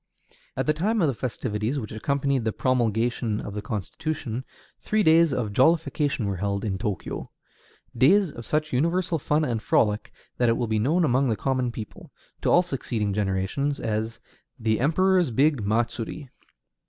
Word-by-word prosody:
At - - 0
the 155 - +3
time 210 +9 0
of - - +4
the 135 - +1
festivities 115 0 -3
which 110 -7 -5
accompanied 140 +3 0
the 110 - 0
promulgation 115 -2 0
of 100 - -6
the 105 - -4
Constitution, 120 - -4 0.4
three 215 0 +1
days 165 -1 +5
of 120 -6 -2
jollification 150 -2 +2
were 100 -2 -2
held 100 +2 -2
in 95 -3 -2
Tōkyō, 105 -4 -4 0.7
days 170 - +4
of 115 - -9
such 155 +3 -1
universal 165 +5 +1
fun 150 +2 +1
and 115 -5 -2
frolic 105 -1 +1 0.3
that 120 -1 +3
it 115 - +2
will 120 - 0
be 110 -1 0
known 160 +10 +2
among 130 0 +2
the 110 - +1
common 130 +2 -1
people, 110 -2 -9 0.3
to - - +1
all 175 - +5
succeeding 115 - -2
generations, 105 +8 -1
as 110 +1 -2 0.4
the 110 -1 +1
"Emperor's 180 +5 +3
big 135 +1 +2
matsuri." 120 +5 -2
125 Hz, 165 wpm, -25 LUFS, 110-150 Hz, 0.7 s, days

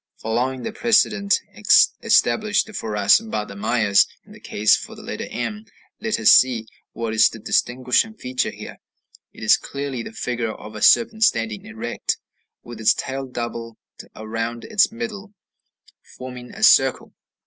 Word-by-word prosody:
Following 125 +4 -2
the 225 - -4
precedent 215 -3 +2 0.6
established 215 0 +2
for 110 - -4
us 100 - +5
by 220 - -4
the 100 - -11
Mayas 105 -1 +2 0.2
in - - -19
the - - -14
case 105 +1 +1
of - - -11
the - - -11
letter - - -6
m, 210 - -5 0.3
let 220 0 -2
us 110 - +6
see 120 -4 +4 0.3
what 115 -1 -4
is 110 0 +5
the - - -10
distinguishing 125 - 0
feature 125 -10 -2
here; - - -10 0.5
it - - -12
is - - +5
clearly 140 -3 -5
the 115 - -8
figure 115 -1 -3
of 110 - -11
a 105 - -8
serpent 225 -1 +4
standing 115 - 0
erect, 115 +2 -4 0.5
with 120 -2 -10
its 110 - +4
tail 135 0 -5
doubled 120 -2 -6 0.4
around 115 +2 -5
its 215 0 +2
middle, 220 -3 -7 0.8
forming 125 -1 -9
a - - -8
circle. - - +4
125 Hz, 155 wpm, -21 LUFS, -, 0.8 s, us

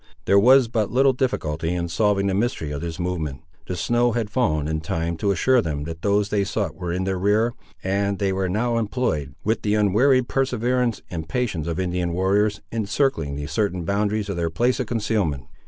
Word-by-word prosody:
There 100 - +5
was 130 +3 +6
but 110 -3 -1
little 135 +2 +4
difficulty 85 - -1
in 85 -1 -2
solving 100 +2 +1
the 100 - +1
mystery 95 -7 -1
of 70 0 -4
this 85 -1 -5
movement. 80 -7 -3 0.2
The 90 - -3
snow 120 +8 +1
had 110 -3 -2
fallen 80 - +1
in 80 0 -2
time 80 +1 -2
to 100 - 0
assure 125 +7 +3
them 75 -6 -3
that 80 +1 -7
those 100 0 +1
they 100 -1 +1
sought - - -2
were 90 -1 -5
in 90 +2 -1
their 95 -1 -1
rear, 105 +5 +2 0.3
and 100 +1 0
they 95 -1 0
were 95 -1 -1
now 115 +4 0
employed, 100 - -2
with 110 +2 0
the 105 0 +1
unwearied 120 +5 +3
perseverance 125 -2 0
and 80 -2 -5
patience 90 -7 -1
of 85 +1 -2
Indian 90 -1 -1
warriors, 100 +3 +1
in 110 -3 -2
circling 100 - 0
the 75 0 -4
certain 90 +3 -1
boundaries 105 +2 0
of 100 -3 -3
their 85 -1 0
place 120 +10 +1
of 125 - -2
concealment. 105 - -1
100 Hz, 205 wpm, -23 LUFS, 85-115 Hz, 0.3 s, was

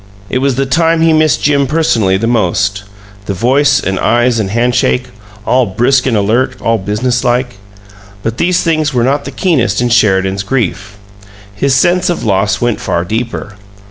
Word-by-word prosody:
It 130 - 0
was 135 -1 0
the 135 +1 0
time 165 +3 +1
he 165 0 +3
missed 155 -1 +2
Jim 140 -2 +2
personally 115 -11 +1
the 110 - -2
most 100 -3 0 0.4
the 100 - -2
voice 140 +7 +2
and 95 0 -2
eyes 120 0 +1
and 100 -3 -2
handshake, 125 +3 0 0.4
all 125 -2 +2
brisk 125 +7 +1
and 115 -4 +1
alert, 110 +6 0
all 115 -1 0
business 120 +6 -1
like. 125 -2 -1 0.7
But 115 +1 -3
these 175 0 +1
things 155 -4 0
were 120 - +2
not 140 +3 0
the - - -5
keenest 130 - 0
in 120 0 0
Sheridan's 95 -4 +2
grief; 100 -3 -3 0.6
his 130 +6 0
sense 175 +6 +2
of 175 - -2
loss 100 0 0
went 120 -2 -1
far 85 +1 -2
deeper. 110 0 -4
120 Hz, 175 wpm, -12 LUFS, 105-140 Hz, 0.7 s, he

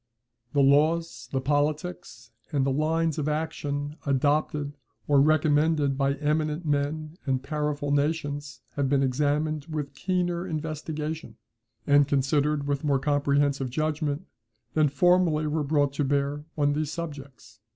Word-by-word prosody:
The 140 -1 +4
laws, 145 -3 +2
the 135 - 0
politics, 145 -3 -2 0.2
and 140 -3 +1
the 135 - +1
lines 160 +2 +1
of 150 0 -1
action 145 -1 -3
adopted 145 +1 0 0.3
or 145 -2 +5
recommended 150 -1 +3
by 140 0 +1
eminent 150 +2 -1
men 150 +2 -1
and 130 -1 0
powerful 150 0 -2
nations 145 0 -1
have 140 -2 -1
been 140 0 +3
examined 145 +3 0
with 150 -3 -4
keener 175 +3 -1
investigation, 155 - -4 0.5
and 145 -1 +5
considered 145 +1 +1
with 140 0 -1
more 145 -2 +2
comprehensive 140 -1 +1
judgment, 155 +3 -1 0.5
than 155 -2 +3
formerly 175 0 +3
were 155 +1 0
brought 145 -1 +1
to 145 - 0
bear 140 +1 0
on 145 -1 +2
these 150 0 -2
subjects. 140 -9 -8
145 Hz, 130 wpm, -27 LUFS, 140-155 Hz, 0.5 s, or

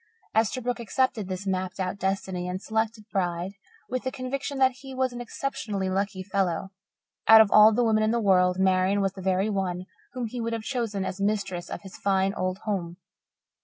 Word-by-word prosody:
Esterbrook 240 +3 +1
accepted 235 -3 0
his 185 +1 -4
mapped 185 -1 -2
out 185 +1 -2
destiny 190 -2 -2
and 180 +1 -3
selected 220 +1 -2
bride 175 -1 -1 0.4
with 255 +1 -2
the 260 - -2
conviction 270 +2 -4
that 260 -1 +3
he 270 -1 -8
was 260 -1 0
an 245 - -6
exceptionally 210 -6 -3
lucky 190 0 -1
fellow. 190 -2 -1 0.6
Out 220 0 +10
of 220 -2 +6
all 215 +1 +8
the 240 +3 +2
women 220 -2 +3
in 215 - +2
the 235 +1 +1
world 180 -3 +3
Marian 190 +1 +3
was 195 -1 0
the 190 - -9
very 190 +2 +1
one 185 -2 -2 0.3
whom 250 -2 -3
he 235 +2 -5
would 230 0 -2
have 225 -1 -3
chosen 220 -6 -2
as 190 +1 -4
mistress 195 -4 -1
of - - -6
his 195 - -10
fine, 195 0 +1
old 185 -1 -2
home. 175 -5 -3
200 Hz, 195 wpm, -26 LUFS, 185-230 Hz, 0.6 s, Out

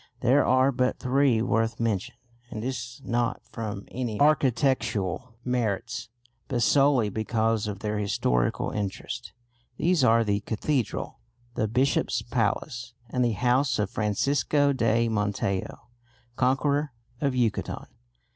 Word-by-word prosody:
There 130 +4 +4
are 130 +2 +4
but 125 0 0
three 130 -3 +2
worth 115 0 0
mention, 115 +1 -1 0.3
and 110 -3 -5
this 120 -1 -4
not 120 +1 0
from 105 -3 -5
any 120 -4 -3
architectural 125 - +1
merits 120 -2 -2 0.4
but 125 -4 0
solely 135 -6 +4
because 110 +1 0
of 100 -2 -5
their 105 -1 -2
historical 60 -12 0
interest. 105 +4 -4 0.5
These 175 -4 +2
are 115 -1 +5
the 100 -2 0
cathedral, 115 +4 -2 0.3
the 110 - 0
bishop's 120 0 +1
palace, 115 +1 -2 0.2
and 125 - +1
the 120 -2 +2
house 125 +5 +2
of 105 - -1
Francisco 140 +6 +1
de 115 -2 +2
Montejo, 100 -3 -1 0.6
conqueror 140 +3 +1 0.3
of 140 -3 +1
Yucatan. 120 -4 -1
120 Hz, 120 wpm, -26 LUFS, 110-130 Hz, 0.6 s, are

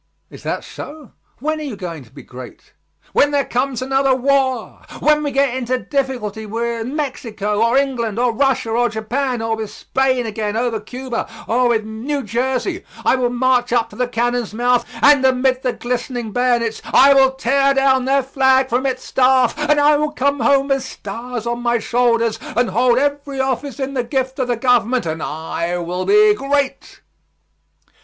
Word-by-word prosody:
"Is - - -12
that - - -3
so? 295 -3 -10 0.3
When 310 +4 -2
are - - -5
you 275 -7 -5
going 170 -7 -7
to - - -21
be - - -12
great?" 125 -1 -12 0.4
"When 290 - +4
there 285 -2 +1
comes 255 0 -1
another 270 0 +2
war! 260 -2 0 0.2
When 300 0 +3
we 295 - -1
get 275 -2 +1
into 255 0 -1
difficulty 245 -6 -3
with 230 +1 -3
Mexico, 230 -7 -3
or 235 +3 +3
England, 240 -6 -1
or 245 0 +2
Russia, 265 -2 +1
or 240 +1 +2
Japan, 235 +3 -2
or 225 0 0
with 220 -2 -5
Spain 260 0 -1
again 215 -1 -3
over 235 -2 -1
Cuba, 245 +3 -5 0.2
or 245 +2 +2
with 225 -2 +1
New 255 +6 -4
Jersey, 260 - -2 0.2
I - - +4
will 250 -2 0
march 245 0 +1
up 235 -2 +1
to - - -12
the 250 0 -1
cannon's 240 -2 -1
mouth, 245 +1 +1 0.2
and 285 -2 +6
amid 260 0 +2
the 250 -2 -1
glistening 245 -2 -4
bayonets 240 -1 0
I 280 +1 +5
will 265 -1 +4
tear 275 +2 +2
down 265 -1 +3
their 275 +1 +2
flag 265 0 +2
from 250 +3 0
its 255 -1 -3
staff, 255 -1 +3
and 300 0 +1
I 295 +1 +5
will 300 0 -1
come 280 0 0
home 275 +3 +2
with 270 -1 +1
stars 240 -1 -7
on 240 0 -2
my 240 0 +1
shoulders, 230 -1 +1 0.2
and 245 -4 +2
hold 240 +3 +3
every 285 0 -1
office 265 0 -2
in 270 0 -3
the 250 -3 -1
gift 260 +1 -2
of 255 - 0
the 245 -1 0
government, 245 -1 +2
and 160 -1 -3
I 165 +3 -3
will 175 +1 -3
be 420 +1 +5
great." 280 -5 -2
250 Hz, 180 wpm, -19 LUFS, 230-270 Hz, 0.4 s, and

